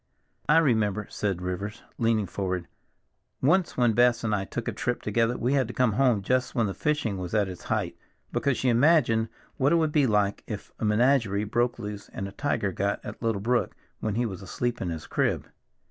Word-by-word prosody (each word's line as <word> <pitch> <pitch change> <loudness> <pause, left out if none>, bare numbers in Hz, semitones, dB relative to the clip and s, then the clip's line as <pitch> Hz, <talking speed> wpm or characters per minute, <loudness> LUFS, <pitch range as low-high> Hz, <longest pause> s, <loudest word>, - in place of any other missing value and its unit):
"I 150 - +6
remember," 110 -9 +2
said 95 -4 -2
Rivers, 95 +3 -4 0.2
leaning 115 -2 +2
forward, 95 -2 -3 0.7
"once 170 +6 +2
when 120 -3 +3
Bess 120 0 +3
and 110 -2 0
I 100 -2 0
took - - -5
a - - +1
trip 125 0 -2
together 115 +3 +1
we 125 +3 0
had 135 -4 +2
to 120 - -8
come 125 -3 +3
home 120 -4 +2
just 130 +5 0
when 115 -3 +2
the 100 - -2
fishing 150 -10 -1
was 90 +3 -4
at 105 -2 +3
its 90 -2 -8
height, - - -1 0.4
because 140 -3 0
she 130 - +1
imagined 120 -4 +4 0.3
what 140 +1 +3
it - - +5
would 160 -2 +2
be 145 -3 +3
like 105 -2 +1
if 105 -3 -6
a - - -1
menagerie 105 -2 +3
broke 120 +3 0
loose 105 -3 -7
and 95 - -4
a - - -8
tiger 105 -6 -1
got 100 +3 -1
at - - -8
little 115 -4 0
Brook 120 +3 0 0.2
when 110 -2 -2
he 120 +1 +1
was 95 -5 -5
asleep 120 +5 -3
in 90 - -2
his 80 -2 -5
crib. - - 0
115 Hz, 210 wpm, -27 LUFS, 100-125 Hz, 0.7 s, I